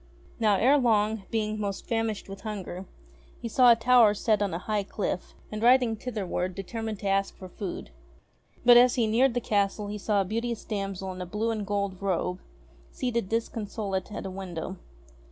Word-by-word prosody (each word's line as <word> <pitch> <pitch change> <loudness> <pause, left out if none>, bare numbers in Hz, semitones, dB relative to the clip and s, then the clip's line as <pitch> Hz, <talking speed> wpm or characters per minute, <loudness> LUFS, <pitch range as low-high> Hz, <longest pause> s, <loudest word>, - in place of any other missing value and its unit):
Now, 215 -3 +4
ere 270 +8 +4
long, 215 -4 +2
being 215 -1 -1
most 200 -2 -3
famished 225 -2 -2
with 195 0 -9
hunger, 195 -4 -6 0.5
he 235 - -5
saw 245 +1 +6
a - - +7
tower 230 -2 +5
set 215 -1 +1
on 200 -2 0
a 165 - -2
high 210 +3 -1
cliff, 195 -2 -4 0.2
and 215 0 -4
riding 245 -1 +5
thitherward 195 -6 -3
determined 220 +3 -4
to 200 - -3
ask 195 0 0
for 185 - -9
food. 180 - -6 0.7
But 240 0 +9
as 250 0 +6
he 240 -3 +2
neared 235 +3 +3
the - - +2
castle 205 -1 0
he 210 0 -5
saw 205 0 +1
a - - -1
beauteous 230 +3 -3
damsel 195 -2 -3
in 185 - -8
a 180 - -5
blue 215 +5 -1
and 215 -3 -3
gold 200 -2 -2
robe 185 -1 -1 0.5
seated 235 -6 -2
disconsolate 210 -4 -3
at 200 - -6
a 190 - -4
window. 185 -1 -6
210 Hz, 185 wpm, -27 LUFS, 195-230 Hz, 0.7 s, But